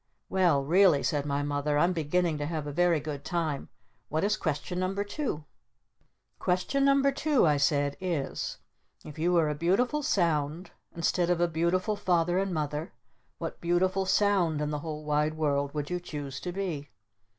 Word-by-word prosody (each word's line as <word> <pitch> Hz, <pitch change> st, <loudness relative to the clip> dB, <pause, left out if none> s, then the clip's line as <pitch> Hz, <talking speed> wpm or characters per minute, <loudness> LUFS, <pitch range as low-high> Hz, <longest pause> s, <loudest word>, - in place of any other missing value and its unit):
"Well 175 Hz, -7 st, +3 dB
really," 170 Hz, -1 st, +4 dB
said 145 Hz, -1 st, 0 dB
my 140 Hz, 0 st, 0 dB
Mother, 145 Hz, +1 st, 0 dB
"I'm 175 Hz, +4 st, +3 dB
beginning 165 Hz, 0 st, 0 dB
to 145 Hz, -, -2 dB
have 155 Hz, -2 st, -3 dB
a 145 Hz, -, -4 dB
very 175 Hz, +1 st, +3 dB
good 145 Hz, -1 st, -6 dB
time. 160 Hz, -5 st, -2 dB, 0.4 s
What 155 Hz, +3 st, 0 dB
is 210 Hz, +1 st, +2 dB
Question 160 Hz, +2 st, -3 dB
No. 185 Hz, +1 st, -1 dB
2?" 205 Hz, -, -3 dB, 0.9 s
"Question 225 Hz, +10 st, +1 dB
No. 275 Hz, 0 st, +4 dB
2," 285 Hz, -, +2 dB
I 150 Hz, -2 st, +3 dB
said, 145 Hz, -1 st, +1 dB
"is: 170 Hz, -7 st, -2 dB, 0.5 s
If 150 Hz, 0 st, -9 dB
you 170 Hz, +3 st, +2 dB
were 165 Hz, -3 st, +4 dB
a 150 Hz, -, 0 dB
Beautiful 195 Hz, -, +1 dB
Sound 165 Hz, -, 0 dB, 0.2 s
instead 170 Hz, +1 st, +1 dB
of 175 Hz, -1 st, +2 dB
a 175 Hz, -, +3 dB
Beautiful 170 Hz, +5 st, 0 dB
Father 175 Hz, -2 st, +1 dB
and 195 Hz, 0 st, -1 dB
Mother, 150 Hz, +1 st, -3 dB, 0.4 s
what -, -, -6 dB
Beautiful 185 Hz, +2 st, +1 dB
Sound 190 Hz, -7 st, +2 dB
in 150 Hz, 0 st, -1 dB
the 150 Hz, -, -2 dB
whole 155 Hz, 0 st, -6 dB
wide 150 Hz, +1 st, +1 dB
world 145 Hz, -2 st, 0 dB
would 150 Hz, +2 st, -3 dB
you 180 Hz, -, -1 dB
choose 145 Hz, -6 st, -6 dB
to 180 Hz, -, -4 dB
be?" 175 Hz, -7 st, -4 dB
165 Hz, 175 wpm, -29 LUFS, 150-185 Hz, 0.9 s, really